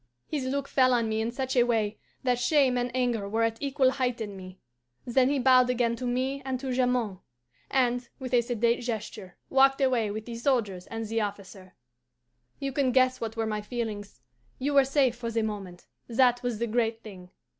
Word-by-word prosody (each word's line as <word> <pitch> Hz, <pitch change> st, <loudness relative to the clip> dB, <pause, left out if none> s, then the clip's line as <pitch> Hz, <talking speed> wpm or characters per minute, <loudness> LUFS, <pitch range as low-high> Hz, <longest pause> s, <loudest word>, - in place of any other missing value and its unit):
His 290 Hz, -4 st, -3 dB
look 280 Hz, +1 st, -2 dB
fell 255 Hz, -2 st, +3 dB
on 230 Hz, -2 st, +1 dB
me 220 Hz, 0 st, -1 dB
in 225 Hz, -, -1 dB
such 260 Hz, +1 st, -3 dB
a 245 Hz, -, +5 dB
way 225 Hz, -3 st, 0 dB, 0.2 s
that 250 Hz, -2 st, +1 dB
shame 270 Hz, -1 st, +3 dB
and 245 Hz, 0 st, 0 dB
anger 240 Hz, -5 st, 0 dB
were 225 Hz, +2 st, +1 dB
at 225 Hz, 0 st, -1 dB
equal 275 Hz, -2 st, +2 dB
height 250 Hz, -3 st, -1 dB
in 205 Hz, -3 st, -5 dB
me. 185 Hz, 0 st, -10 dB, 0.5 s
Then 255 Hz, +1 st, +3 dB
he 285 Hz, -, +1 dB
bowed 255 Hz, -1 st, +5 dB
again 240 Hz, -2 st, +1 dB
to 250 Hz, -, -4 dB
me 260 Hz, +3 st, -1 dB
and 260 Hz, -1 st, -3 dB
to 265 Hz, 0 st, -4 dB
Jamond, 245 Hz, -6 st, 0 dB, 0.5 s
and, 245 Hz, -2 st, +1 dB
with 255 Hz, -2 st, -7 dB
a 245 Hz, -, +5 dB
sedate 235 Hz, 0 st, 0 dB
gesture, 215 Hz, -5 st, -5 dB, 0.2 s
walked 270 Hz, +1 st, +5 dB
away 250 Hz, -5 st, +2 dB
with 215 Hz, +1 st, -5 dB
the 235 Hz, -, -7 dB
soldiers 225 Hz, -8 st, 0 dB
and 225 Hz, 0 st, -5 dB
the 225 Hz, +1 st, -1 dB
officer. 195 Hz, -2 st, -7 dB, 0.8 s
"You 275 Hz, 0 st, -3 dB
can 275 Hz, -2 st, +1 dB
guess 255 Hz, 0 st, +3 dB
what 225 Hz, 0 st, -4 dB
were 225 Hz, -, 0 dB
my 215 Hz, -1 st, -2 dB
feelings. 210 Hz, -, -5 dB, 0.4 s
You 285 Hz, +3 st, -1 dB
were 275 Hz, -1 st, +6 dB
safe 270 Hz, -3 st, +2 dB
for 235 Hz, -1 st, -5 dB
the 225 Hz, -1 st, 0 dB
moment 195 Hz, -5 st, -6 dB, 0.2 s
that 245 Hz, 0 st, +3 dB
was 245 Hz, -3 st, -2 dB
the 235 Hz, -, -1 dB
great 230 Hz, 0 st, -1 dB
thing. 185 Hz, -4 st, -11 dB
240 Hz, 200 wpm, -28 LUFS, 220-260 Hz, 0.8 s, were